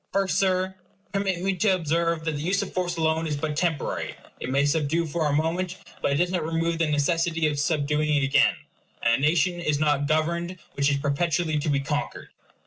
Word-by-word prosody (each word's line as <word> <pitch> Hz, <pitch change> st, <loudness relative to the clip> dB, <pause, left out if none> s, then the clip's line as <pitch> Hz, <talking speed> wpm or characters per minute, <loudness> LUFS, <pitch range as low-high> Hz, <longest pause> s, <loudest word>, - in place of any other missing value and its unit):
First, 195 Hz, -1 st, +1 dB
Sir, 185 Hz, -1 st, +1 dB, 0.4 s
permit 195 Hz, -3 st, -1 dB
me 195 Hz, 0 st, +1 dB
to 190 Hz, +1 st, +3 dB
observe 165 Hz, -1 st, 0 dB
that 160 Hz, -, +1 dB
the 145 Hz, -1 st, -4 dB
use 190 Hz, +5 st, +1 dB
of 200 Hz, -, -8 dB
force 175 Hz, -2 st, -1 dB
alone 160 Hz, 0 st, +1 dB
is 150 Hz, -2 st, -2 dB
but 150 Hz, +1 st, -2 dB
temporary. 160 Hz, -2 st, -1 dB, 0.2 s
It -, -, -4 dB
may 140 Hz, +2 st, +2 dB
subdue 160 Hz, +2 st, +1 dB
for 160 Hz, 0 st, -1 dB
a -, -, 0 dB
moment, 170 Hz, +4 st, -1 dB, 0.2 s
but -, -, +1 dB
it -, -, +1 dB
does 175 Hz, +4 st, +1 dB
not 180 Hz, -3 st, 0 dB
remove 165 Hz, +1 st, -1 dB
the 165 Hz, -, +2 dB
necessity 165 Hz, +2 st, +1 dB
of 150 Hz, -2 st, 0 dB
subduing 150 Hz, -1 st, +1 dB
again; 135 Hz, -, +4 dB, 0.5 s
and 115 Hz, -, +4 dB
a -, -, +5 dB
nation 175 Hz, +2 st, +2 dB
is 150 Hz, -4 st, 0 dB
not 145 Hz, -2 st, +2 dB
governed 170 Hz, +4 st, 0 dB, 0.2 s
which 140 Hz, 0 st, +2 dB
is 140 Hz, -, +1 dB
perpetually 155 Hz, +2 st, 0 dB
to 155 Hz, +1 st, -2 dB
be 140 Hz, -1 st, +1 dB
conquered. 145 Hz, +1 st, -3 dB
160 Hz, 205 wpm, -25 LUFS, 150-175 Hz, 0.5 s, a